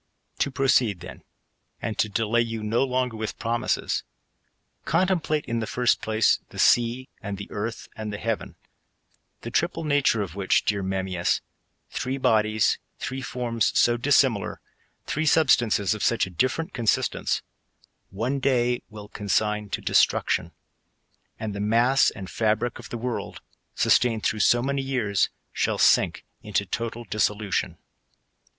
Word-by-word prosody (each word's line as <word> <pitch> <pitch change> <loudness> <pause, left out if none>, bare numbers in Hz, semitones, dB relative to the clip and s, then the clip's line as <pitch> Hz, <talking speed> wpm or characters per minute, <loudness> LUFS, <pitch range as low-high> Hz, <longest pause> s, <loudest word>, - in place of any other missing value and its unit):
To - - +1
proceed, 130 -8 +2
then, - - -10 0.6
and 110 - -3
to 105 - +2
delay 115 +3 +1
you 115 -2 -3
no 115 +4 +1
longer 125 -2 -1
with 110 0 -4
pro 120 +1 -1
mises, - - -1 0.8
contemplate, 165 -3 +1
in 115 -2 -2
the 110 - -3
first 125 -1 +1
place, 110 0 +2
the - - -12
sea, 120 +2 +3
and 100 -1 -5
the 100 - -6
earth, 110 +2 -4
and 110 -1 -5
the 105 - -4
heaven; 115 0 -3 0.9
the - - -6
triple - - 0
nature 145 -7 +2
of 95 - -7
wliich, 95 +1 +1
dear 100 -1 0
Memmius, 95 -2 -1 0.5
(three 130 +1 -2
bodies, 110 -4 +2 0.2
three 130 +1 -4
forms 120 -3 -1
so 120 - +4
dissimilar, 120 -4 +2 0.5
tlircc 155 +1 -1
substances 120 - +3
q/* 110 - 0
such 115 +2 +2
a 95 - -10
different 130 - -1
ctmsistence,) 115 -3 0 0.7
one 120 +8 -2
day 125 -2 +1
will 105 -2 -10
consign 105 +1 -1
to - - -4
destmc - - +3
tion; - - 0 0.9
and 110 -2 -4
the 100 - -5
mass 115 +6 +3
and 95 -3 -8
fabric 110 +4 0
of - - -10
the 120 - -4
world, 120 +1 -4 0.4
sustained 115 -3 +3
through 110 - 0
so 120 +4 +4
many 140 +1 -1
years, 125 -7 0 0.2
shall - - 0
sink - - +3 0.2
itilo 100 -2 -2
total 115 0 -3
dissolution. 105 -5 -1
115 Hz, 145 wpm, -25 LUFS, 105-125 Hz, 0.9 s, so